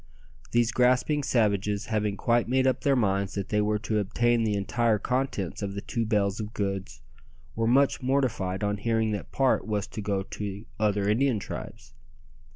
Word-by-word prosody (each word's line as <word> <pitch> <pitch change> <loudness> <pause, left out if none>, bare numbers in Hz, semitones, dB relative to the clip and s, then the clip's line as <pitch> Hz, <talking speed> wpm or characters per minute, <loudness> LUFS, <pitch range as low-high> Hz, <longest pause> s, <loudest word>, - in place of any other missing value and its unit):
These 120 0 +2
grasping 130 +5 +2
savages 105 -5 +1
having 105 -2 0
quite 120 -1 +2
made 130 +2 +2
up 130 - +1
their 140 -1 +3
minds 100 -4 0
that 100 -1 -3
they 105 0 +2
were 105 0 +1
to 110 0 -1
obtain 115 +3 +1
the 105 -2 +1
entire 110 +3 +1
contents 125 -6 -2
of 100 -1 -4
the 100 - -4
two 115 +1 -2
bales 105 -2 +1
of 110 +1 -6
goods, 95 -6 -3 0.5
were 115 0 0
much 135 +3 +3
mortified 115 -8 0
on 105 0 0
hearing 110 +1 0
that 105 - -5
part 135 -3 +1
was 105 -1 -1
to 110 - -6
go 100 -1 -1
to 100 +1 -6
other 105 -2 +1
Indian 120 +3 +2
tribes. 70 -7 -8
105 Hz, 175 wpm, -27 LUFS, 100-120 Hz, 0.5 s, their